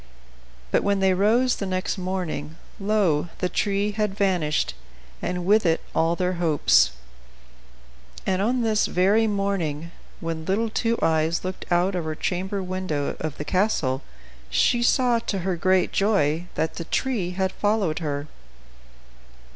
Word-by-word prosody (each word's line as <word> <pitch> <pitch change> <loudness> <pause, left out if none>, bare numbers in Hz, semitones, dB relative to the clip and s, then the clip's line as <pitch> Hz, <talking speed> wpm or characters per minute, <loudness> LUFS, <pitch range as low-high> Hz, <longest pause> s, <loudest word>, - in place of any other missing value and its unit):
But - - +3
when 200 -1 +1
they 190 -1 +3
rose 230 +7 +3
the 200 - -3
next 185 0 -1
morning, 180 -5 -3 0.2
lo! 195 -6 +1
the 180 - 0
tree 200 +2 0
had 210 -1 -2
vanished, 180 -7 +1 0.5
and 180 -1 -3
with 210 +3 +4
it 165 -2 +2
all 165 +1 +2
their 180 +1 0
hopes. 145 - +4 1.3
And 190 0 +1
on 240 +4 +1
this 215 -2 +2
very 205 +5 +3
morning, 185 -6 -2 0.3
when 165 -1 -4
little 215 +5 0
Two 230 +1 0
Eyes 160 +2 +1
looked 185 0 -6
out 175 +3 +3
of 175 -3 -2
her 155 0 -3
chamber 190 +4 -2
window 185 -6 -2
of 155 -2 -4
the 150 - -5
castle, 150 -8 +1 0.5
she 235 - +2
saw, 245 -1 +3
to 210 -3 -3
her 185 0 -1
great 185 +1 +2
joy, 175 -5 +1
that 160 +1 -1
the 170 - -4
tree 210 -8 -1
had 190 -1 +1
followed 205 -7 0
her. 145 -3 -3
185 Hz, 145 wpm, -24 LUFS, 165-205 Hz, 1.3 s, with